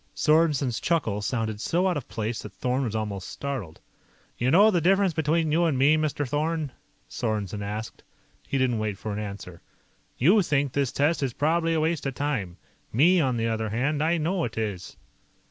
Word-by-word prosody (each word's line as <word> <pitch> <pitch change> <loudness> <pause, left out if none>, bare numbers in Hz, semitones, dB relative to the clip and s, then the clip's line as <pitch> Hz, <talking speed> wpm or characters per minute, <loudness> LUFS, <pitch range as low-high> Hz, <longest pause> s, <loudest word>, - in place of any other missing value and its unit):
Sorensen's 150 -7 +2
chuckle 115 -11 0
sounded 110 -1 -2
so 180 +8 +1
out 180 - +1
of 140 - -5
place 110 0 -3
that 105 - -10
Thorn 130 +1 -1
was 110 -2 -3
almost 105 -4 -3
startled. 130 - -5 0.6
"You 125 - 0
know 205 +9 +6
the 175 -4 +1
difference 190 +1 +3
between 160 0 +1
you 170 +3 +3
and 155 -5 +1
me, 140 +4 +5
Mr. 150 -2 -1
Thorn?" 150 +1 -1 0.4
Sorensen 105 -3 -3
asked. 105 +2 -5 0.5
He - - -1
didn't 125 -4 +1
wait 105 -2 -2
for 105 +1 -5
an 105 - -3
answer. 100 -4 -7 0.6
"You 185 - +5
think 145 -6 0
this 140 -3 0
test 145 +3 +1
is 135 -4 -1
probably 165 +4 +1
a - - +2
waste 160 -2 0
of 135 - -4
time. 115 -12 -2 0.3
Me, 170 +10 +4
on 130 -4 0
the 115 0 0
other 110 -1 -1
hand, 135 +7 0
I 165 +2 +2
know 170 +3 0
it 115 - -4
is." 100 -4 -4
135 Hz, 190 wpm, -26 LUFS, 110-160 Hz, 0.6 s, know